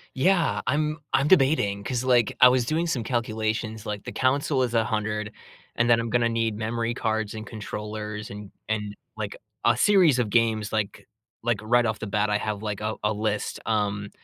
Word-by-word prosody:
Yeah, 170 +3 +2
I'm 155 +1 0 0.2
I'm 135 +2 +3
debating 135 - +3
'cause, 125 -1 -1
like, 120 -4 +3
I 125 - +10
was 125 -1 +2
doing 160 +6 0
some 135 -8 -1
calculations, 110 -2 -2
like, 105 -1 -4
the - - -6
console 130 0 +1
is 120 - -6
100 110 -2 -1 0.5
and 120 0 +2
then 115 -1 +5
I'm 115 - -4
gonna 120 +1 +2
need 115 -2 -1
memory 115 +1 -2
cards 110 -3 -1
and 110 0 -7
controllers 105 0 -6
and 105 -1 -9 0.2
and, 105 -1 -2 0.2
like, - - -5 0.3
a - - +4
series 180 -10 +5
of 115 -4 0
games, 110 -2 +1
like 105 -2 -2 0.4
like, 115 -3 +1
right 120 +2 +3
off 110 - -1
the - - -4
bat, 105 +1 0
I 105 - +2
have, 105 -1 -3
like, 105 -2 -4
a 110 +1 -2
a 105 +1 +2
list, 105 0 -2
um, 105 -2 -1
110 Hz, 190 wpm, -25 LUFS, 105-125 Hz, 0.5 s, I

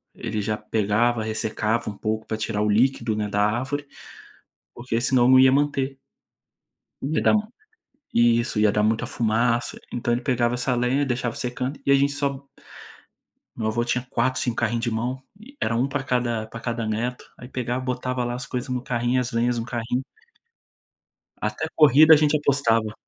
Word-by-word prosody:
ele 105 -1 -3
já 105 +1 -1
pegava, 110 +2 0
ressecava 110 +1 -1
um 105 - -8
pouco 110 0 -2
pra 110 - -2
tirar 105 -1 -2
o 105 - +1
líquido, 115 0 +2
né, 105 -1 -2
da 105 0 +1
árvore, 135 +7 -1 0.9
porque 120 -1 -2
senão 125 0 +3
eu - - +4
não 130 0 +7
ia 130 0 +6
manter. 135 -1 0 1.0
Ia 145 +4 -1
dar - - +4
ruim 215 0 0 0.7
isso, 120 -1 +3
ia 105 -1 +4
dar 105 - +1
muita 110 +1 +1
fumaça, 115 +1 0
então 120 0 -1
ele 120 - -3
pegava 120 -1 +1
essa 125 +1 0
lenha 125 +4 +1
e - - +2
deixava 120 -2 -2
secando 125 +3 -3
e 140 - +3
a - - +7
gente 140 +1 +3
só 140 -1 -3 1.1
Meu 110 -2 -2
avô 120 +2 0
tinha 125 +1 -1
4, 130 +1 0
5 120 -2 -1
carrinho 120 0 0
de 120 0 -1
mão, 120 +4 -3 0.2
e 270 +7 -16
era 115 - 0
um 125 +4 +1
pra 140 0 -2
cada 120 -4 -1
pra 115 - -9
cada 115 -1 -3
neto, 115 +3 -3
aí 125 - -11
pegava, 125 0 -3
botava 125 0 -2
lá 120 0 -2
as 125 +2 -5
coisas 125 +1 -4
no 125 -1 -2
carrinho, 120 +1 0
as 125 0 -2
lenhas 120 0 +1
no 115 - -4
carrinho 120 0 -2 1.4
Até - - -2
corrida 155 +1 +7
a - - +8
gente 150 0 +3
apostava. 115 -7 +1
120 Hz, 185 wpm, -24 LUFS, 115-130 Hz, 1.4 s, a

